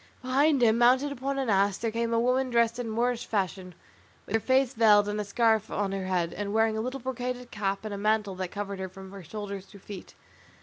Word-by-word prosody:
Behind 270 +1 +3
him, 225 0 +4
mounted 255 +4 +4
upon 275 +1 -3
an 270 -2 -1
ass, 200 -1 +2
there 230 -1 -2
came 230 +1 -1
a 230 - +2
woman 255 +2 +1
dressed 235 0 +2
in 240 -2 -3
Moorish 240 +2 -1
fashion, 190 -3 -2 0.5
with - - -8
her 225 - +3
face 260 +1 +2
veiled 210 -2 +5
and 210 0 -2
a - - -2
scarf 220 +1 +1
on 200 -1 -1
her 195 -1 -3
head, 175 -2 0
and 205 0 -4
wearing 220 0 +3
a 220 - -1
little 255 +4 -4
brocaded 250 -1 -4
cap, 200 0 -2
and 215 - -4
a 200 - -5
mantle 210 -1 +1
that 185 0 -4
covered 200 -1 -5
her 190 0 -4
from 190 0 -11
her 200 -1 -9
shoulders 200 +1 -7
to - - -19
her 190 - -20
feet. 200 -3 -10
220 Hz, 235 wpm, -28 LUFS, 200-245 Hz, 0.5 s, veiled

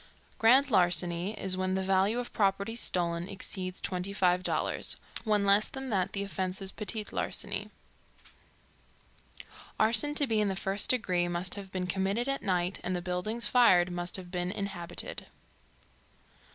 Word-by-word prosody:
Grand 260 +5 +5
larceny 180 +1 +1
is 185 -1 +3
when 185 0 -1
the 190 - -1
value 195 +4 +2
of 245 0 -4
property 200 +2 0
stolen 175 -5 0
exceeds 185 -2 -4
$25.00 185 -1 0 0.3
When 210 -2 +2
less 200 +2 +4
than 265 -2 -6
that, 190 -2 0
the 200 - -1
offence 190 -1 -3
is 195 -1 -6
petit 215 0 -2
larceny. - - -3 2.1
Arson 230 +7 +3
to 290 - +3
be 220 -4 +1
in 210 - +1
the 195 - -1
first 195 +1 0
degree 185 -8 +2
must 175 +1 -1
have 200 -2 -4
been 185 -1 -3
committed 195 +6 -1
at 275 0 -1
night 180 -1 0
and 185 - -2
the 175 - -3
buildings 185 +6 -2
fired 185 -8 +5
must 175 0 -2
have 180 -2 -6
been 180 -1 -2
inhabited. 185 -3 -5
195 Hz, 150 wpm, -30 LUFS, 180-210 Hz, 2.1 s, Grand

